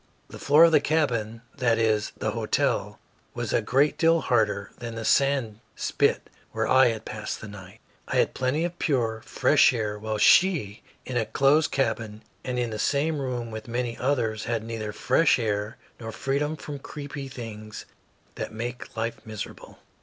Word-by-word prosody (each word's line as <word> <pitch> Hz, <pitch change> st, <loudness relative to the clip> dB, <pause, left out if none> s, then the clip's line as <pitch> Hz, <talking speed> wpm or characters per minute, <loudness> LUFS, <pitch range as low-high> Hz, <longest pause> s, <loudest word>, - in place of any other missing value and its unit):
The -, -, -10 dB
floor 150 Hz, +3 st, +6 dB
of 170 Hz, -, +7 dB
the 155 Hz, -, +6 dB
cabin 115 Hz, -7 st, 0 dB, 0.2 s
that 120 Hz, -3 st, +3 dB
is, 110 Hz, -2 st, +1 dB
the 110 Hz, -, -1 dB
hotel 110 Hz, -1 st, -1 dB, 0.4 s
was -, -, -3 dB
a -, -, +3 dB
great 140 Hz, +4 st, +2 dB
deal 165 Hz, 0 st, +4 dB
harder 105 Hz, -4 st, 0 dB
than 120 Hz, -1 st, -6 dB
the 115 Hz, -1 st, -5 dB
sand 135 Hz, -6 st, +2 dB, 0.2 s
spit -, -, 0 dB, 0.3 s
where -, -, -1 dB
I 130 Hz, 0 st, +6 dB
had 110 Hz, -2 st, -3 dB
passed 110 Hz, 0 st, -5 dB
the 110 Hz, -, -8 dB
night. 100 Hz, 0 st, -12 dB, 0.3 s
I -, -, -3 dB
had -, -, +2 dB
plenty 130 Hz, +6 st, 0 dB
of 175 Hz, 0 st, -6 dB
pure, 115 Hz, -7 st, 0 dB
fresh -, -, +4 dB
air, 105 Hz, -4 st, -3 dB
while 110 Hz, 0 st, -3 dB
she, 135 Hz, -, +4 dB, 0.2 s
in 125 Hz, -, -3 dB
a 110 Hz, -3 st, 0 dB
closed 140 Hz, +7 st, +3 dB
cabin 110 Hz, -5 st, -2 dB, 0.2 s
and 125 Hz, -1 st, -3 dB
in 120 Hz, -2 st, -1 dB
the 110 Hz, -, -5 dB
same 145 Hz, +5 st, +1 dB
room 125 Hz, -4 st, -3 dB
with 110 Hz, +1 st, -7 dB
many 120 Hz, 0 st, -2 dB
others, 115 Hz, -5 st, -1 dB
had 115 Hz, -2 st, -2 dB
neither 110 Hz, -2 st, -5 dB
fresh 160 Hz, +8 st, +3 dB
air 105 Hz, -1 st, -2 dB, 0.2 s
nor 115 Hz, -1 st, -6 dB
freedom 140 Hz, +6 st, -1 dB
from 145 Hz, -2 st, -7 dB
creeping 140 Hz, -1 st, -7 dB
things 110 Hz, -4 st, -8 dB, 0.5 s
that -, -, -5 dB
make 120 Hz, +2 st, -6 dB
life 115 Hz, +1 st, -3 dB
miserable. 110 Hz, -2 st, -8 dB
115 Hz, 175 wpm, -26 LUFS, 110-140 Hz, 0.5 s, of